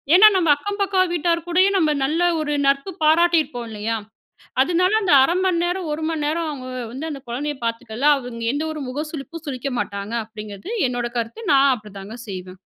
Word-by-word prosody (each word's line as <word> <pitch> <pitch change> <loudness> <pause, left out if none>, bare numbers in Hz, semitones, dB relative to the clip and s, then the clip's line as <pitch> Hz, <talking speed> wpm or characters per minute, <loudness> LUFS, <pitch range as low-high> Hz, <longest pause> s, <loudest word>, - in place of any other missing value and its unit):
ஏன்னா, 430 +3 +9
நம்ம 345 -4 +2
அக்கம் 405 +7 -5
பக்கம் 375 -3 +2
வீட்டார் 340 0 0
கூடயும், 375 +3 +3
நம்ம 315 -4 +3
நல்ல 315 +5 0 0.2
ஒரு 295 -1 -1
நட்பு 275 +7 +1
பாராட்டியிருப்போம் 315 -7 +3
இல்லையா? 220 +1 -2 0.6
அதனால 355 +5 +2
அந்த 365 -6 +3
1/2 340 +6 +2
மணிநேரம் 350 -1 0
1 315 +1 -4
மணி 315 -2 -2
நேரம் 325 +2 -1
அவங்க 260 -3 -6 0.2
வந்து 290 +6 -5
அந்த 275 -2 -7
குழந்தையை 290 +4 -3
பார்த்துக்கலாம். 235 +5 +1
அவங்க 240 -2 -7
எந்த 290 - -1
ஒரு 305 - -6
முக 295 +4 -3
சுழிப்பும் 320 +2 -8
சுழிக்க 270 0 -3
மாட்டாங்க. 200 +2 -4
அப்படிங்கிறது 215 - -9 0.2
என்னோட 245 -1 -2
கருத்து. 235 - -4
நான் 275 0 +5
அப்படி 215 -3 -12
தாங்க 205 +4 -8
செய்வேன். 185 -1 -7
295 Hz, 180 wpm, -22 LUFS, 240-340 Hz, 0.6 s, ஏன்னா